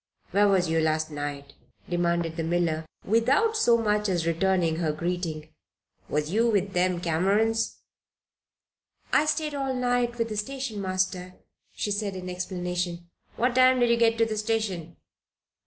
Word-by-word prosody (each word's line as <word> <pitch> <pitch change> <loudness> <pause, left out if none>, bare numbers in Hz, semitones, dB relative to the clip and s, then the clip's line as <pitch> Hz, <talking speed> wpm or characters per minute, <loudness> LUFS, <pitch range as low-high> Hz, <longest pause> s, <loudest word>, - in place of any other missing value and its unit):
"Where 205 +1 +4
was 190 -3 +3
you 160 0 +1
last 155 0 0
night?" 145 -1 -5 0.3
demanded 170 -1 0
the 165 - -2
miller, 165 -1 0 0.2
without 260 - +2
so 240 - +4
much 210 -2 +1
as 175 -3 0
returning 170 -1 +1
her 165 -2 0
greeting. 160 -1 -3 0.6
"Was 150 +1 -1
you 230 +4 +3
with 200 -3 0
them 180 0 +1
Camerons?" 200 +7 +1 1.3
"I 310 - +4
stayed 305 0 0
all 270 -2 -2
night 245 -1 0
with 230 -1 -1
the 215 - -4
station 240 -1 -3
master," 185 -1 -2 0.4
she 205 - -3
said, 200 -1 -2
in 185 0 -6
explanation. 180 -1 -4 0.2
"What 245 +1 +1
time 255 0 +5
did 240 -1 +3
you 235 - +3
get 230 -1 +3
to 230 - +3
the 220 -1 -3
station?" 205 -7 -2
190 Hz, 155 wpm, -26 LUFS, 170-230 Hz, 1.3 s, time